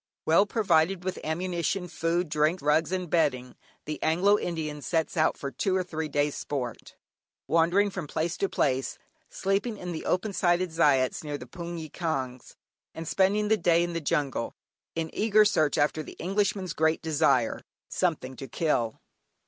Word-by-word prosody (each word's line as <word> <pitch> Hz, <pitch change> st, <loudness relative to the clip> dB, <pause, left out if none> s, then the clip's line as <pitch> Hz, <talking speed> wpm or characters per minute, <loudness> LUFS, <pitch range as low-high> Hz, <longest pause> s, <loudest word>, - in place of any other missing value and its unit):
Well 170 Hz, +6 st, +5 dB
provided 190 Hz, -4 st, +2 dB
with 185 Hz, 0 st, -3 dB
ammunition, 175 Hz, +2 st, -1 dB
food, 170 Hz, +1 st, -1 dB
drink, 155 Hz, +4 st, +1 dB
rugs, 155 Hz, +3 st, +2 dB
and 185 Hz, -1 st, -2 dB
bedding, 140 Hz, -7 st, 0 dB, 0.3 s
the 155 Hz, 0 st, -5 dB
Anglo 195 Hz, +6 st, +3 dB
Indian 155 Hz, -3 st, -3 dB
sets 160 Hz, +1 st, -1 dB
out 155 Hz, 0 st, +2 dB
for 140 Hz, -, -5 dB
two 185 Hz, -, 0 dB
or 185 Hz, -, +1 dB
three 160 Hz, -3 st, -4 dB
days 145 Hz, 0 st, +1 dB
sport, 125 Hz, -5 st, -5 dB, 0.5 s
wandering 175 Hz, +5 st, +3 dB
from 185 Hz, -5 st, -5 dB
place 165 Hz, +5 st, -1 dB
to 195 Hz, -, 0 dB
place, 130 Hz, -1 st, 0 dB, 0.3 s
sleeping 200 Hz, +4 st, -1 dB
in 180 Hz, -2 st, -5 dB
the 160 Hz, -, -5 dB
open 195 Hz, +3 st, 0 dB
sided 175 Hz, -1 st, +2 dB
"zayats," 145 Hz, -6 st, +2 dB
near 145 Hz, -1 st, -4 dB
the 125 Hz, -, -9 dB
hpoongyi 170 Hz, +2 st, -7 dB
kyaungs, 135 Hz, -8 st, -4 dB, 0.4 s
and 165 Hz, 0 st, -6 dB
spending 200 Hz, +4 st, +2 dB
the 220 Hz, +1 st, +3 dB
day 170 Hz, -2 st, +3 dB
in 175 Hz, 0 st, -3 dB
the 165 Hz, -, -2 dB
jungle, 145 Hz, -5 st, -1 dB, 0.4 s
in 165 Hz, -1 st, -2 dB
eager 215 Hz, 0 st, +4 dB
search 155 Hz, -8 st, +2 dB
after 150 Hz, +2 st, +2 dB
the -, -, -9 dB
Englishman's 195 Hz, -1 st, -1 dB
great 160 Hz, +1 st, +1 dB
desire 145 Hz, -7 st, +2 dB, 0.3 s
"something 155 Hz, -8 st, -1 dB
to 135 Hz, -, -7 dB
kill." 120 Hz, -5 st, 0 dB
165 Hz, 165 wpm, -28 LUFS, 150-185 Hz, 0.5 s, Well